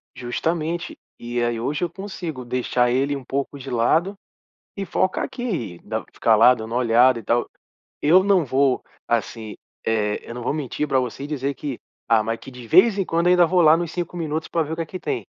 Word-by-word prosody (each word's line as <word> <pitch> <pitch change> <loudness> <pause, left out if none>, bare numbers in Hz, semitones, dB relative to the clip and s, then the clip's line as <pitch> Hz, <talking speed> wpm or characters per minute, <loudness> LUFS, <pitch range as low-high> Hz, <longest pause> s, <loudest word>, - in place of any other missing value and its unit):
Justamente 165 +7 -3 0.2
e 120 0 -2
aí 120 -1 -1
hoje 145 +8 -2
eu 175 - 0
consigo 170 -7 -6
deixar 125 0 +1
ele 135 +3 +1
um 135 - -7
pouco 140 +2 -3
de 135 0 -8
lado 155 - +2 0.6
e 200 - -4
foca 185 +1 0
aqui, 180 - -4
não 110 +1 -3
ficar 115 - +3
lá 115 +4 +7
dando 110 -1 -6
olhada 120 +1 +4
e - - -11
tal. 120 +3 0 0.5
Eu 175 +6 +5
não 195 -5 +3
vou, 135 0 +1 0.2
assim, 115 -2 -2 0.3
eh, 105 -2 0
eu - - -6
não 120 - -6
vou 125 - 0
mentir 150 0 -3
pra 135 - +2
você 125 +1 -4
e - - -5
dizer 140 -2 -2
que, 140 -5 -5 0.3
ah, 115 -2 +4
mas 115 +1 -3
que - - -11
de 125 -2 -11
vez 195 - +5
em 195 - 0
quando 170 +1 +1
eu - - +5
ainda 180 -1 +6
vou 180 +2 +3
lá 155 -1 +7
nos 170 -1 -3
5 175 0 -4
minutos 160 -1 -3
pra 165 - 0
ver 155 +1 -5
o - - -2
que 165 - -3
é - - -10
que 185 +4 -7
tem. 400 - -3
140 Hz, 220 wpm, -22 LUFS, 120-170 Hz, 0.6 s, lá